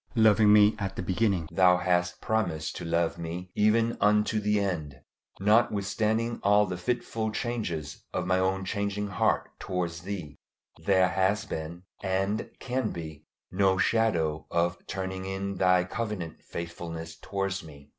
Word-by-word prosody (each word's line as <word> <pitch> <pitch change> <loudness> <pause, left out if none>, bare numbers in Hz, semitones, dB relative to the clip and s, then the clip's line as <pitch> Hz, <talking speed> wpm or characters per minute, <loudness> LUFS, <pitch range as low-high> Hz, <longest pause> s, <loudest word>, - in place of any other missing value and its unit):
Loving 110 -2 +6
me 105 0 +6
at 95 -2 -3
the - - -3
beginning, 95 -3 +1
Thou 90 -1 +5
hast 90 0 0
promised 85 -9 -1
to - - -6
love 85 0 0
me 85 +2 -5
even 115 +2 +2
unto 105 +1 +3
the 105 0 +1
end. 80 -9 -3 0.4
Notwithstanding 110 +2 +2
all 105 +1 +4
the 95 -2 -4
fitful 110 +1 -2
changes 105 - -3
of 90 - -2
my 95 0 +2
own 95 0 0
changing 100 +1 -2
heart 100 - +1
towards 85 -2 -3
Thee, 90 -6 -6 0.5
there 95 -2 +5
has 95 +2 +1
been, 80 +3 -6 0.2
and 95 +2 -1
can 125 -3 -1
be, 80 -3 -8 0.2
no 95 +1 +3
shadow 90 -8 +1
of 85 +1 0
turning 95 0 -4
in 95 0 -3
Thy 90 -1 +4
covenant 95 -4 -4
faithfulness 85 -1 -6
towards 95 +1 -3
me. 70 -3 -13
95 Hz, 145 wpm, -28 LUFS, 85-105 Hz, 0.5 s, Loving